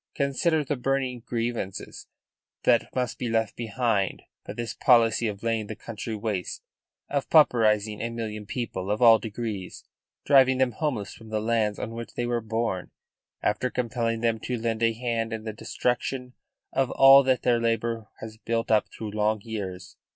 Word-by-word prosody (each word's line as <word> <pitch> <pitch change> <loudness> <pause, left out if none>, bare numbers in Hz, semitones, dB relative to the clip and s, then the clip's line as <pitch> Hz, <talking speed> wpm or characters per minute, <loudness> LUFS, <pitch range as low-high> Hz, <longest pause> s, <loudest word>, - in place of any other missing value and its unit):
Consider 150 +3 +1
the 140 +1 -2
burning 130 -1 -1
grievances 115 -5 -4 0.6
that - - +3
must 125 -2 -2
be 120 - -2
left 115 -1 0
behind 110 -3 -1 0.2
by - - -7
this 120 -2 -4
policy 120 -3 +4
of 100 -1 -5
laying 115 -2 0
the 110 - -6
country 110 +1 -6
waste, 105 -4 -3 0.4
of 140 -1 -2
pauperising 110 -8 +4
a 115 - -2
million 110 -3 -5
people 100 -6 -4
of 105 +1 0
all 115 -2 +7
degrees, 105 -4 -5 0.4
driving 130 -2 +5
them 130 -1 +2
homeless 115 -6 -3
from 110 -1 -13
the 110 0 -1
lands 110 -2 0
on - - -4
which 115 0 -8
they 120 - -1
were 120 -1 0
born, 110 -3 -2 0.5
after 125 - +1
compelling 115 -2 -1
them 115 -1 +1
to 125 +3 -3
lend 115 -1 -2
a 115 0 +3
hand 115 -1 -2
in 110 -1 -5
the 110 -1 -5
destruction 125 +3 -2 0.4
of 135 -2 +1
all 135 +1 +8
that 130 -3 +1
their 120 -1 +3
labour 115 -1 -1
has 110 0 -8
built 115 0 -2
up 110 -2 +4
through 110 -2 -7
long 110 +1 +1
years. 100 -5 -6
115 Hz, 170 wpm, -26 LUFS, 110-125 Hz, 0.6 s, all